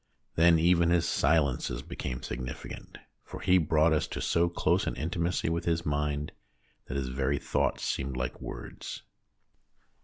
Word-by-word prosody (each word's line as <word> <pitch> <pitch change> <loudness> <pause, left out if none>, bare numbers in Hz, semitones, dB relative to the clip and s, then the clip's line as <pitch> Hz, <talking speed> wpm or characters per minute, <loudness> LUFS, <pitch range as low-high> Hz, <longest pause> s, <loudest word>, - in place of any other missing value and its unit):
Then 85 0 +5
even 85 +1 +4
his 85 -1 +3
silences 70 -4 +1
became 60 0 -5
significant, 65 0 -6 0.3
for - - -9
he 90 0 +4
brought 80 0 +3
us 80 0 +1
to - - -5
so 85 +1 +2
close 85 - +1
an - - -1
intimacy 85 +6 -1
with 85 +1 -1
his 85 0 0
mind 75 0 -1 0.6
that 65 - -3
his 65 -2 -2
very 65 +2 0
thoughts - - 0
seemed 65 -1 -2
like 65 +1 -3
words. - - -7
75 Hz, 150 wpm, -29 LUFS, 65-85 Hz, 0.6 s, Then